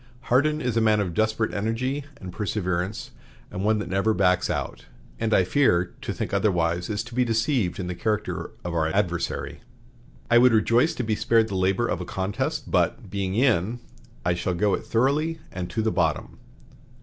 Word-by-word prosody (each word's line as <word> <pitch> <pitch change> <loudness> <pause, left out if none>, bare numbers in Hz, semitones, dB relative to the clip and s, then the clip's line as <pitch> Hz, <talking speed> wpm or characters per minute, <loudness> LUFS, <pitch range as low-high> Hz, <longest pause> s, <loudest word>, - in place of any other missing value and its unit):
Hardin 150 +4 +3
is 125 -5 -1
a 115 - +3
man 110 -1 +3
of 95 -4 -1
desperate 110 +3 0
energy 125 +7 -2
and 90 -2 -8
perseverance, 105 +3 -2 0.4
and 95 - -4
one 110 +1 +3
that 105 - -4
never 95 +4 +1
backs 90 -1 +2
out; - - -4 0.3
and, 115 -1 -1
I 95 - +5
fear, 90 -4 +2
to - - -3
think - - -4
otherwise 85 -3 +1
is 105 +1 -2
to 110 - -12
be 125 +1 +2
deceived 115 - 0
in 95 - -3
the 90 - -3
character 105 +3 -2 0.2
of 90 - -3
our 80 -2 +1
adversary. 90 -1 -2 0.7
I 120 - +5
would 125 -1 +6
rejoice 115 +7 +3
to 125 - -2
be 110 -1 0
spared 110 +1 +2
the 100 - -3
labor 95 +5 +1
of - - -2
a - - -4
contest, 95 +3 -3
but, - - 0
'being 95 -1 -2
in,' 120 -2 +2 0.5
I 90 - +3
shall 90 +1 -2
go 100 +3 +2
it - - -3
thoroughly 150 +7 +1
and 90 -1 -5
to 110 - -2
the 110 - +1
bottom." - - -1
105 Hz, 190 wpm, -25 LUFS, 90-115 Hz, 0.7 s, would